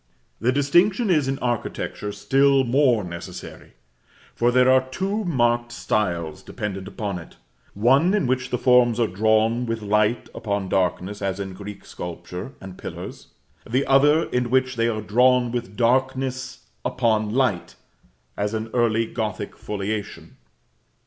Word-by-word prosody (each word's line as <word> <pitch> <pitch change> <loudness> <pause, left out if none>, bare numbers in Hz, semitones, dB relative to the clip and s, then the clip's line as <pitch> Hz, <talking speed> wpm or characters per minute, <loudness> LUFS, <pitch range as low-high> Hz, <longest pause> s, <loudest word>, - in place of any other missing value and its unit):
This 125 +3 +1
distinction 185 - +3
is, 150 -5 +2
in 135 0 -1
architecture, 120 -3 -3
still 135 +7 +3
more 125 -3 +3
necessary; 90 +1 -9 0.6
for 120 - +2
there 125 +1 +4
are 130 0 +4
two 195 +9 -2
marked 120 -6 +1
styles 90 -10 -2
dependent 95 -2 -5
upon 100 -2 -4
it: 85 - -13 0.4
one 135 - +4
in 205 - +1
which 130 0 -1
the 125 - 0
forms 125 -2 +4
are 115 - +4
drawn 110 +4 +1
with 115 -1 -3
light 105 +3 +1
upon 100 -4 -3
darkness, 95 +2 -1
as 95 -1 -2
in 95 -1 -5
Greek 100 +1 -9
sculpture 90 +6 -7
and 95 -1 -10
pillars; - - -8 0.4
the 130 +4 +1
other 145 +4 +4
in 125 -1 0
which 130 +1 +1
they 115 0 +1
are 110 -2 -1
drawn 125 +3 +3
with 120 -4 -4
darkness 130 +1 0 0.2
upon 110 -3 0
light, 125 -10 0 0.6
as 105 +2 -2
in 110 0 -3
early 115 -2 +2
Gothic 105 -3 -4
foliation. 105 0 -5
115 Hz, 140 wpm, -23 LUFS, 105-130 Hz, 0.6 s, there